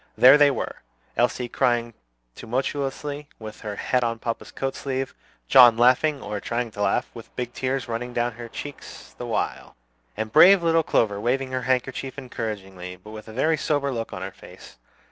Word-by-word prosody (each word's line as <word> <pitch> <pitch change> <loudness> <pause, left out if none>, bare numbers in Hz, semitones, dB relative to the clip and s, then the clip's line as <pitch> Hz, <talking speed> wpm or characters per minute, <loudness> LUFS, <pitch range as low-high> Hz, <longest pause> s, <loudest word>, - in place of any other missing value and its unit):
There 130 +2 +9
they 145 -1 +6
were: 130 - -3 0.4
Elsie 120 +1 +1
crying 120 -1 0 0.4
tumultuously, 140 - -3
with 110 -1 -9
her 105 -1 -5
head 125 +4 0
on 115 -1 -1
papa's 115 +1 -4
coat 135 0 -3
sleeve; 135 -1 -3 0.3
John 120 - +8
laughing, 130 +4 +3
or 105 0 -4
trying 120 +2 -3
to 105 - -7
laugh, 100 -1 +1
with 115 -1 -12
big 120 -1 -4
tears 130 +1 -2
running 120 +1 -4
down 120 0 0
her 120 +1 -9
cheeks 145 +4 -9
the - - -5
while; - - -3 0.4
and 110 0 -3
brave 180 +3 +8
little 165 0 +4
Clover 105 -9 +1
waving 130 +3 0
her 130 0 -1
handkerchief 130 +1 -1
encouragingly, 95 -8 -6
but 90 +4 -14
with 110 0 -10
a - - -9
very 155 +8 +1
sober 145 -2 0
look 115 -3 -4
on - - -6
her - - -5
face. - - -15
125 Hz, 180 wpm, -24 LUFS, 115-135 Hz, 0.4 s, There